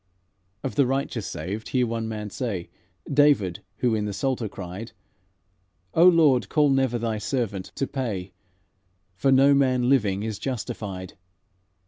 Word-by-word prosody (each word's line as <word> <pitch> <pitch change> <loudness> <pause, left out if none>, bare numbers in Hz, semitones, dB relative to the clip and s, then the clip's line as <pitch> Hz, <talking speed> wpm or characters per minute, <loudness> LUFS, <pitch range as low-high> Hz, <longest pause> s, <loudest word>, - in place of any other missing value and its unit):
"Of 135 - -3
the 140 -3 +3
righteous 130 -5 -2
saved, 95 +7 -5
hear 125 -1 +2
one 115 -1 -3
man 105 -2 -5
say 100 -9 -4 0.4
David, 135 -11 +3 0.2
who 120 0 +1
in 105 -1 0
the 105 - -3
Psalter 125 0 -1
cried: 95 +4 -8 1.0
'O 170 +2 +6
Lord, 145 - +4
call 150 -2 +3
never 135 -3 +2
Thy 115 -2 -2
servant 105 -5 -2
to 135 - -1
pay, 105 -10 -4 0.8
For 100 +9 +1
no 135 +2 +6
man 130 -3 +2
living 105 -7 +2
is 110 -2 -4
justified.' 105 -7 -5
115 Hz, 140 wpm, -25 LUFS, 100-135 Hz, 1.0 s, O